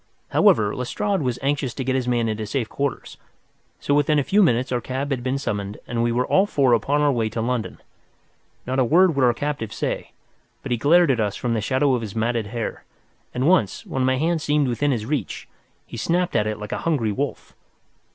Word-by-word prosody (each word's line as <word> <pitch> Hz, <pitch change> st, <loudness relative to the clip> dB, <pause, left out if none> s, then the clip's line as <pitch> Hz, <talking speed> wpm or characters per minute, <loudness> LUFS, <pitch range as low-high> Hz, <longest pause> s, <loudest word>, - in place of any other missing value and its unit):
However, 105 Hz, -2 st, +3 dB
Lestrade 195 Hz, +10 st, -1 dB
was 125 Hz, -3 st, -1 dB
anxious 140 Hz, -3 st, -1 dB
to 135 Hz, -, -3 dB
get 130 Hz, +1 st, -1 dB
his 130 Hz, -2 st, -1 dB
man 120 Hz, -2 st, +1 dB
into 110 Hz, -1 st, -3 dB
safe 120 Hz, 0 st, -2 dB
quarters, 140 Hz, 0 st, -4 dB, 0.6 s
so 145 Hz, -, -1 dB
within 145 Hz, +1 st, +3 dB
a 145 Hz, -, +2 dB
few 205 Hz, +9 st, +3 dB
minutes 130 Hz, -, +2 dB
our 125 Hz, -1 st, 0 dB
cab 135 Hz, +4 st, -4 dB
had 130 Hz, -3 st, -1 dB
been 130 Hz, +2 st, -1 dB
summoned 105 Hz, -6 st, -4 dB
and 120 Hz, -1 st, -2 dB
we 120 Hz, 0 st, +1 dB
were 125 Hz, +2 st, +1 dB
all 195 Hz, +2 st, +3 dB
four 135 Hz, -9 st, +2 dB
upon 140 Hz, +6 st, +1 dB
our 145 Hz, -1 st, +3 dB
way 115 Hz, -4 st, 0 dB
to 115 Hz, -, -5 dB
London. 120 Hz, 0 st, -2 dB, 0.9 s
Not 130 Hz, +2 st, -1 dB
a -, -, +5 dB
word 170 Hz, +7 st, +4 dB
would 135 Hz, -, +2 dB
our 120 Hz, -2 st, +4 dB
captive 140 Hz, -7 st, -3 dB
say, -, -, -3 dB, 0.5 s
but -, -, -6 dB
he 120 Hz, -, +2 dB
glared 165 Hz, +3 st, +5 dB
at 125 Hz, -, 0 dB
us 105 Hz, -2 st, 0 dB
from 120 Hz, -1 st, -2 dB
the 110 Hz, -, 0 dB
shadow 130 Hz, +5 st, +1 dB
of 125 Hz, -, 0 dB
his 110 Hz, -2 st, -7 dB
matted 115 Hz, -1 st, -1 dB
hair, 115 Hz, +1 st, -5 dB, 0.5 s
and 130 Hz, +3 st, -1 dB
once, 170 Hz, -, +2 dB
when 130 Hz, -, -2 dB
my 130 Hz, 0 st, +2 dB
hand 165 Hz, +3 st, 0 dB
seemed 150 Hz, -1 st, +1 dB
within 125 Hz, +4 st, 0 dB
his 115 Hz, -6 st, -1 dB
reach, 145 Hz, +3 st, -3 dB, 0.4 s
he -, -, -9 dB
snapped 175 Hz, +9 st, 0 dB
at 105 Hz, -2 st, +2 dB
it 110 Hz, -, -2 dB
like 105 Hz, 0 st, -8 dB
a -, -, -2 dB
hungry 140 Hz, -10 st, 0 dB
wolf. 140 Hz, +7 st, -4 dB
130 Hz, 220 wpm, -23 LUFS, 115-145 Hz, 0.9 s, a